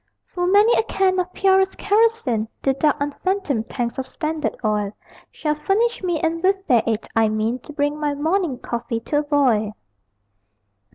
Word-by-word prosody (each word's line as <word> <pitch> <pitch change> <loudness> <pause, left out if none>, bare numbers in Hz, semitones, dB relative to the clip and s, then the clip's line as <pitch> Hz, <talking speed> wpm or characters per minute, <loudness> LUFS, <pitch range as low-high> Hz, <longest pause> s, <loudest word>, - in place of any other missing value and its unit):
Full 355 0 -1
many 410 +5 +5
a - - +4
can 380 -4 +1
of 365 0 -2
purest 385 0 +2
kerosene 410 - +1 0.2
The 270 - +3
dark 295 +2 +2
unfathomed 290 - -2
tanks 240 0 -3
of 260 - -4
Standard 310 -2 -3
Oil 210 -1 0 0.4
Shall 300 -1 -1
furnish 405 +10 0
me, 350 -4 -1
and 330 +1 -1
with 385 +1 +1
their 245 - +4
aid 225 -1 -1
I 225 -1 +4
mean 215 +3 -1
To 275 - -12
bring 290 0 -1
my 295 -1 -1
morning 320 -1 0
coffee 235 -1 -4
to 290 +5 0
a - - +1
boil. 255 -8 +1
300 Hz, 170 wpm, -21 LUFS, 240-380 Hz, 0.4 s, many